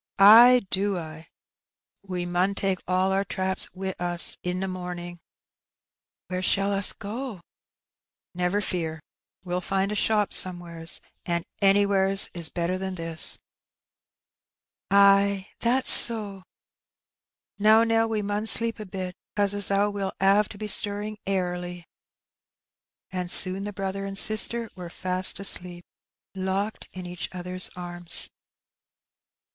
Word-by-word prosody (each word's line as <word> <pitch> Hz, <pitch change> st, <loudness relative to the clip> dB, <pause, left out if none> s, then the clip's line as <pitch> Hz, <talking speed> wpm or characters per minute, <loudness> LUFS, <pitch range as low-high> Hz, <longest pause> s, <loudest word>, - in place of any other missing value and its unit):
"Ay 235 Hz, +5 st, +7 dB
do 195 Hz, 0 st, +1 dB
I. 160 Hz, -1 st, -9 dB, 0.7 s
We 180 Hz, -2 st, -5 dB
mun 180 Hz, +3 st, -1 dB
take 195 Hz, -2 st, -1 dB
all 185 Hz, +1 st, 0 dB
our 195 Hz, +1 st, 0 dB
traps 190 Hz, -1 st, -2 dB
wi' 190 Hz, 0 st, -4 dB
us 175 Hz, -1 st, +1 dB
i' 180 Hz, -, -2 dB
t' 185 Hz, +1 st, -3 dB
morning." 180 Hz, -2 st, -7 dB, 1.1 s
"Where 185 Hz, 0 st, -5 dB
shall 195 Hz, +2 st, 0 dB
us 200 Hz, 0 st, +1 dB
go?" 230 Hz, +4 st, -7 dB
^' 175 Hz, -, -18 dB, 0.9 s
Never 180 Hz, +3 st, -1 dB
fear, 165 Hz, -5 st, -4 dB, 0.4 s
we'll 180 Hz, 0 st, -4 dB
find 195 Hz, +2 st, -2 dB
a -, -, -3 dB
shop 210 Hz, -1 st, 0 dB
somewheres, 170 Hz, -2 st, -1 dB, 0.3 s
an' 170 Hz, -1 st, -1 dB, 0.2 s
anywheres 195 Hz, -1 st, +2 dB, 2.6 s
"Ay, 200 Hz, -1 st, +3 dB
that's 255 Hz, +3 st, +3 dB
so." 210 Hz, -4 st, +7 dB, 1.2 s
"Now, 215 Hz, +2 st, +5 dB
Nell, 225 Hz, 0 st, +1 dB
we 215 Hz, -2 st, -2 dB
mun 205 Hz, +2 st, -3 dB
sleep 230 Hz, 0 st, +3 dB
a 210 Hz, -, -8 dB
bit, 185 Hz, -1 st, -6 dB, 0.2 s
'cause 205 Hz, -1 st, +1 dB
as 205 Hz, -1 st, -2 dB
how 200 Hz, +1 st, 0 dB
we'll 200 Hz, -1 st, -4 dB
'ave 200 Hz, +2 st, +3 dB
to -, -, -11 dB
be 215 Hz, -, -6 dB
stirring 210 Hz, +1 st, 0 dB
airly. 180 Hz, -2 st, -4 dB, 1.3 s
And 180 Hz, -1 st, -4 dB
soon 190 Hz, +2 st, +5 dB
the 205 Hz, -, -5 dB
brother 195 Hz, 0 st, -5 dB
and 195 Hz, 0 st, -5 dB
sister 225 Hz, +3 st, 0 dB
were 180 Hz, -2 st, -10 dB
fast 185 Hz, +2 st, 0 dB
asleep, 180 Hz, -3 st, -5 dB, 0.5 s
locked 195 Hz, +3 st, -4 dB
in 185 Hz, -1 st, -9 dB
each 175 Hz, 0 st, -6 dB
other's 180 Hz, 0 st, -1 dB
arms. 175 Hz, -1 st, 0 dB
195 Hz, 125 wpm, -24 LUFS, 180-205 Hz, 2.6 s, Ay